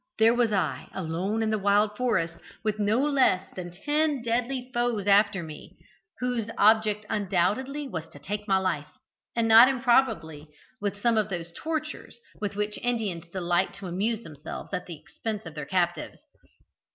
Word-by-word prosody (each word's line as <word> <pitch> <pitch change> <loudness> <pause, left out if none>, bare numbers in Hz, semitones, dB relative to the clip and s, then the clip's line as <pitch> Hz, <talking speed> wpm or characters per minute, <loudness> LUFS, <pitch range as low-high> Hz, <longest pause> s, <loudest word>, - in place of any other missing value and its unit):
there 225 +1 +5
was 240 -2 +2
I, 195 -3 -1
alone 190 +5 -1
in 220 - 0
the 215 - +1
wild 205 +1 +3
forest, 180 -9 0 0.3
with 215 -1 -1
no 210 +2 +2
less 260 -10 +3
than 180 -1 -5
ten 295 - 0
deadly 245 +2 -1
foes 240 -4 0
after 200 -2 +4
me, 155 -2 -10 0.4
whose 245 -3 -1
object 215 0 +4
undoubtedly 210 +9 0
was 165 -9 -5
to - - -14
take 205 +9 -5
my 195 -1 +4
life, 185 -6 -1 0.5
and 230 -1 +2
not 225 +2 +9
improbably 235 - +1 0.3
with 205 0 -2
some 230 0 +3
of 215 -1 -1
those 170 -2 -5
tortures 310 -5 -4 0.2
with 205 -1 -3
which 210 0 -2
Indians 220 -8 -2
delight 175 0 0
to 195 - -9
amuse 210 +6 -1
themselves 155 -3 -8
at 180 - -3
the 170 -3 -7
expense 220 +3 -5
of 165 - -8
their 150 -2 -6
captives. 175 -2 -1
210 Hz, 165 wpm, -27 LUFS, 180-235 Hz, 0.5 s, not